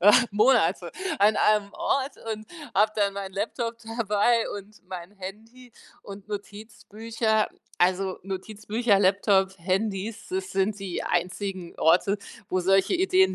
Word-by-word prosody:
äh, 205 +3 +7 0.2
Monate 225 +6 +3 0.3
an 210 +1 +5
einem 210 -1 +3
Ort 295 -5 0 0.2
und 215 0 -7 0.3
habe 210 +2 +4
dann 200 -1 +2
meinen 195 -1 -6
Laptop 230 +3 -3 0.2
dabei 225 +1 +2
und 205 +2 -15
mein 180 0 -7
Handy 220 +6 -10 0.3
und 200 0 -10
Notizbücher. 215 +1 -2 0.3
Also 185 +1 +2
Notizbücher, 210 +3 0
Laptop, 190 0 +3
Handys, 200 +4 -2
das 190 0 -3
sind 195 +2 +1
die 190 -3 -4
einzigen 180 0 -2
Orte, 180 +5 +3 0.3
wo 185 - 0
solche 195 - +3
Ideen 375 +1 +3
205 Hz, 125 wpm, -26 LUFS, 190-220 Hz, 0.3 s, äh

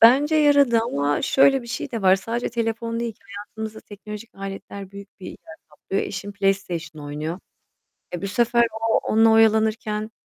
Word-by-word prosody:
bence 275 +7 +6
yaradı 285 -6 +5
ama 145 -9 -1
şöyle 270 -1 +4
bir - - -12
şey 245 +3 -5
de 230 -4 -4
var. 190 0 +6
Sadece 230 +5 -3
telefon 230 0 -2
değil 235 -1 -2
ki - - -34 0.2
hayatımızda 220 +1 -7
teknolojik 210 +2 -10
aletler 195 0 -8
büyük 200 0 -13
bir - - -8
yer - - -8 0.3
kaplıyor. 170 +6 -3
Eşim 200 +1 -6
PlayStation 175 -6 -2
oynuyor. 155 +4 -4 0.8
Eee, 175 - -5
bu 200 - -2
sefer 235 +3 +3 0.2
o - - +4
onunla 225 +1 +3
oyalanırken 220 -1 +2
220 Hz, 165 wpm, -23 LUFS, 195-230 Hz, 0.8 s, bence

